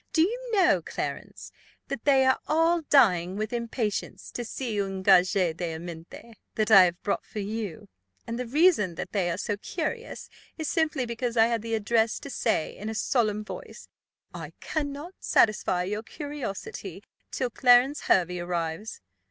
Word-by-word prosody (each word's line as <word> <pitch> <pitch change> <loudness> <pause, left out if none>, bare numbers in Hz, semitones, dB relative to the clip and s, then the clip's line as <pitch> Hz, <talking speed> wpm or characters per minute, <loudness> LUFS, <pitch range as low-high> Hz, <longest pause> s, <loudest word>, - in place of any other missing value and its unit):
"Do 320 - +5
you 485 +6 -3
know, 375 -5 +4
Clarence, - - -6 0.4
that 275 -4 -5
they 270 -2 +5
are 260 - +3
all 330 +2 +3
dying 185 -10 +4
with 215 +2 -3
impatience 235 -3 -3
to 240 - -4
see 230 -3 -3
un 195 -1 -4
gage 185 -1 +5
d'amitié 170 +3 -4 0.2
that 215 0 0
I 195 -3 +9
have 175 0 -3
brought 205 - -1
for - - -12
you; 210 -4 -4 0.4
and 230 +1 -4
the 250 - -3
reason 270 - +3
that 180 - -6
they 190 -4 0
are 170 - -2
so 205 +1 -2
curious 375 - -5 0.3
is 315 -2 -3
simply 305 -4 0
because 235 0 -3
I 225 - +7
had 230 -1 0
the 225 0 -2
address 225 +1 +1
to 280 - -8
say, 220 -11 -1
in 210 +2 -6
a 220 - -4
solemn 215 -2 0
voice, - - -9 0.4
'I - - -8
cannot 295 +3 -4
satisfy 190 -4 +2
your 210 +4 -3
curiosity 290 - -7 0.3
till 255 -2 -2
Clarence 250 +4 +4
Hervey 180 -1 +2
arrives. 175 +3 -4
225 Hz, 160 wpm, -27 LUFS, 195-275 Hz, 0.4 s, I